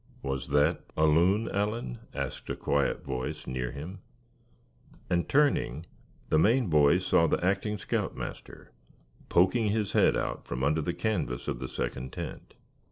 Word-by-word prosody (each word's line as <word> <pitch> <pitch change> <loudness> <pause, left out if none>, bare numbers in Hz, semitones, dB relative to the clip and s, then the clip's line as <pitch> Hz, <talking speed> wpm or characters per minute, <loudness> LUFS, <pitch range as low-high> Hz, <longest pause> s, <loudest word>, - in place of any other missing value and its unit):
"Was 65 -1 -3
that 75 +1 +2 0.2
a 80 - +4
loon, 90 +8 +3
Allan," 105 - -2
asked - - -5
a - - -1
quiet 70 -1 0
voice 65 -1 -4
near 65 -1 -3
him; 85 +7 -7 1.1
and 85 -1 +1
turning, 135 - +2 0.4
the 80 - +4
Maine 115 +1 +3
boy 75 +2 +5
saw 90 -2 +3
the 85 - 0
acting 100 +2 0
scout - - -2
master - - -8 0.6
poking 105 +6 +3
his 105 -1 0
head - - +4
out - - -3
from 60 +2 -4
under 75 +3 +2
the 85 +3 -2
canvas 95 - -2
of - - -2
the 65 - -4
second 65 +1 -4
tent. - - -7
85 Hz, 155 wpm, -29 LUFS, 70-100 Hz, 1.1 s, boy